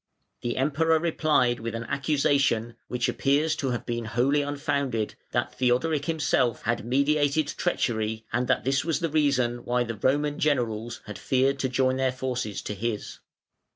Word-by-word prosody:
The 120 - -2
Emperor 155 +4 +2
replied 155 -7 +2
with 115 0 -4
an 115 - -3
accusation 140 -4 +1
(which 125 0 -1
appears 150 +3 +1
to 135 - -1
have 120 -3 -3
been 120 -1 -3
wholly 130 +6 +2
unfounded) 140 -6 -1 0.2
that - - -1
Theodoric 135 +4 +1
himself 145 -7 +1
had 115 0 0
meditated 145 +4 +2
treachery, 110 -9 -1
and 125 +1 +1
that 130 - +1
this 135 +1 +1
was 165 -1 0
the 165 - -1
reason 140 -6 +2
why 125 0 +1
the 115 -1 -4
Roman 145 +2 +1
generals 120 -6 0
had 105 -2 -8
feared 135 +1 +1
to 130 - 0
join 130 0 +1
their 130 -1 +1
forces 125 -5 -3
to - - -4
his. 110 +1 -4
130 Hz, 160 wpm, -26 LUFS, 120-145 Hz, 0.2 s, Emperor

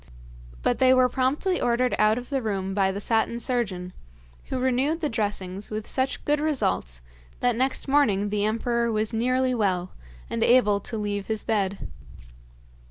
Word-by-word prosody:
But - - +1
they 260 0 +5
were 255 0 +5
promptly 270 +9 0
ordered 245 -1 +1
out 215 +1 +4
of 250 +3 -7
the 270 -1 0
room 195 -4 -2
by 195 -1 +2
the 195 - -4
Satin 225 +2 0
Surgeon, 195 -8 -2 0.5
who - - -3
renewed 260 +5 +1
the 305 -3 -1
dressings 205 -4 -3
with 215 0 -4
such 260 0 -2
good 295 0 +2
results 90 - -1 0.4
that 245 -1 +1
next 260 +4 0
morning 215 -8 +2
the 205 0 -1
emperor 235 +2 0
was 215 0 0
nearly 255 +3 +1
well, 185 -6 0 0.4
and 115 - -1
able 210 -5 +4
to 225 +3 -5
leave 205 -1 -3
his 220 -2 -2
bed. 200 -3 -1
225 Hz, 165 wpm, -25 LUFS, 205-255 Hz, 0.5 s, they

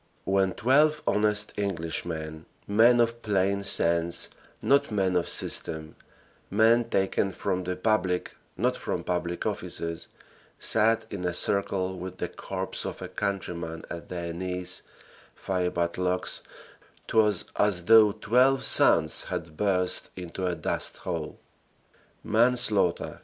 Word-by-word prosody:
When 95 -1 +1
twelve 150 +5 +3
honest 105 0 +1
Englishmen, 80 -4 -3 0.2
men 115 +4 +5
of 115 0 +1
plain 100 -2 0
sense, 85 -3 +2 0.3
not 140 +1 +2
men 95 -4 0
of 90 - 0
system, 80 -1 -2 0.5
men 115 +3 +4
taken 95 -1 0
from 95 -1 -3
the 90 +1 -2
public 90 -2 -1 0.2
not - - +1
from - - -4
public 85 -1 -3
offices, 85 0 -3 0.5
sat 110 0 +4
in 95 -3 -5
a 90 -1 -1
circle 95 -1 +1
with 95 +1 -7
the - - -3
corpse - - -4
of - - -6
a - - -5
countryman 90 -4 -4
at 85 -1 -7
their 85 -1 -5
knees, 90 +1 -2 0.6
fiebat 90 -2 -2
lux; 90 0 0 0.7
'twas 105 -2 +2
as 95 -4 +1
though 110 -1 +7
twelve 125 +6 +2
suns - - +4
had 80 -2 -6
burst 90 -1 0
into 90 +1 -5
a 90 - -1
dust 80 - -3
hole. 80 -4 -5 0.9
"Manslaughter!" 110 -6 +1
95 Hz, 125 wpm, -27 LUFS, 90-105 Hz, 0.9 s, though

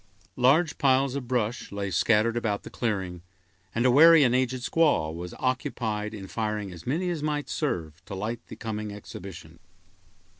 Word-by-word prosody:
Large 150 +6 +3
piles 135 -2 +3
of 135 -3 -4
brush 120 -2 -1
lay 100 -1 -3
scattered 115 +2 +3
about 110 -4 -1
the - - -10
clearing, 95 -7 -2 0.5
and 120 +2 +1
a 125 - +5
wary 160 +3 +8
and 125 -2 +3
aged 130 -1 0
squaw 145 - +2
was 90 +1 -7
occupied 110 -4 -2
in 100 -2 -7
firing 105 -1 -3
as 85 +2 -11
many 175 +7 0
as 165 -4 -3
might 150 -1 -2
serve 85 - -3
to 100 - -7
light 110 +4 -3
the - - -9
coming 105 -2 -5
exhibition. 90 -5 -10
115 Hz, 165 wpm, -27 LUFS, 100-130 Hz, 0.5 s, wary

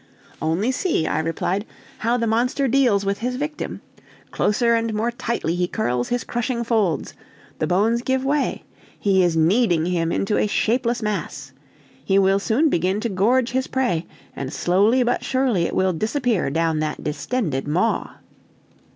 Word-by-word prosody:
"Only 165 - +1
see," 280 - 0
I - - 0
replied, 165 +4 -1 0.4
"how 235 +2 +1
the 230 - 0
monster 245 +5 +1
deals 240 -6 +3
with 200 0 -1
his 250 +2 -2
victim; 295 +3 -4 0.5
closer 235 +3 +2
and 230 -1 0
more 225 +3 0
tightly 235 -8 -2
he 175 0 0
curls 125 - -1
his 245 0 -1
crushing 240 0 -2
folds, 220 -8 0 0.5
the 155 - 0
bones 215 +7 +2
give 260 +1 -1
way, 285 +1 0 0.3
he 195 -2 +2
is 175 -2 +2
kneading 170 0 +3
him 170 -2 0
into 195 +4 0
a - - +2
shapeless 235 +2 0
mass. 190 -9 -4 0.5
He 195 +6 +2
will 195 0 +4
soon 235 +10 +2
begin 185 - +1
to 235 - -1
gorge 230 +6 +2
his 260 +1 -1
prey, 185 -11 -1 0.3
and 135 -1 -5
slowly 205 +11 +2
but 245 - 0
surely 255 -10 +1
it - - -3
will 185 0 +2
disappear 225 - 0
down 160 +1 0
that 155 0 -3
distended 150 - -2
maw!" 180 +10 0
210 Hz, 160 wpm, -22 LUFS, 175-245 Hz, 0.5 s, will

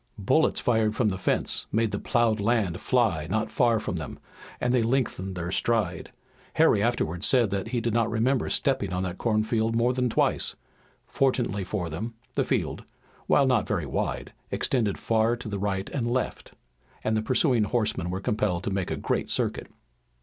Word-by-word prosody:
Bullets - - +2
fired 110 -3 +1
from 110 -3 +2
the 95 - -3
fence - - +1
made 110 0 +1
the 100 - -2
ploughed 115 -2 +1
land 100 -5 0
fly 105 -12 +1
not 110 +2 -1
far 120 -3 +3
from 90 - -3
them, 80 -3 -6 0.4
and 125 0 +1
they 125 - +3
lengthened 115 -6 -1
their 85 0 -4
stride. 105 -5 0 0.4
Harry 100 - +4
afterward 100 -7 -1
said 120 -4 +4
that 100 0 -2
he 120 +1 -1
did 115 -1 -1
not 115 -1 +2
remember 120 +4 +1
stepping 130 -9 +1
on 90 +1 -1
that 90 -1 -4
cornfield 110 0 +1
more 120 +2 +2
than 125 -1 0
twice. - - 0 0.5
Fortunately 120 -7 0
for 95 -2 -3
them 110 +9 -5 0.2
the - - +1
field, - - -2 0.4
while 140 - +4
not 125 -5 +2
very - - -1
wide, - - -3 0.2
extended 110 -7 0
far 115 +1 +1
to 120 -2 -7
right 95 -1 -2
and 120 -4 -1
left, 125 +1 -3 0.5
and 110 - +1
the 110 - +1
pursuing 125 -1 +2
horsemen 105 -5 -1
were 95 +1 -2
compelled 100 -3 -1
to 100 - -2
make 95 -2 -2
a - - -1
great - - -1
circuit. - - -1
110 Hz, 180 wpm, -26 LUFS, 95-120 Hz, 0.5 s, Harry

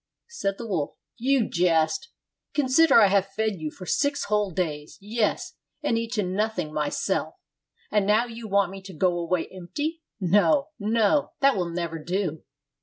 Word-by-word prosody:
Said 195 - -2
the 235 - -6
wolf, 170 -9 -2 0.2
"You 255 -1 +2
jest! 160 -3 +1 0.5
Consider 295 +3 +4
I 215 - +7
have 195 0 +2
fed 220 -2 -1
you 155 -2 -4
for 185 +4 -11
six 285 +7 +1
whole 210 -1 +1
days, 155 -4 -3
yes, 230 - -1 0.3
and 265 - +1
eaten 225 -5 -1
nothing 190 -6 -1
myself, 150 -1 -1 0.6
and 210 -2 +2
now 215 +3 +4
you 230 -1 -8
want 200 -2 +2
me 195 0 -8
to 190 -2 -11
go 180 +2 +2
away 170 0 0
empty? 290 - -4 0.2
No, 210 - +3
no, 220 +6 +2
that 275 -1 +5
will 180 -3 -1
never 170 -1 -3
do! 175 -3 -2
200 Hz, 160 wpm, -26 LUFS, 175-230 Hz, 0.6 s, I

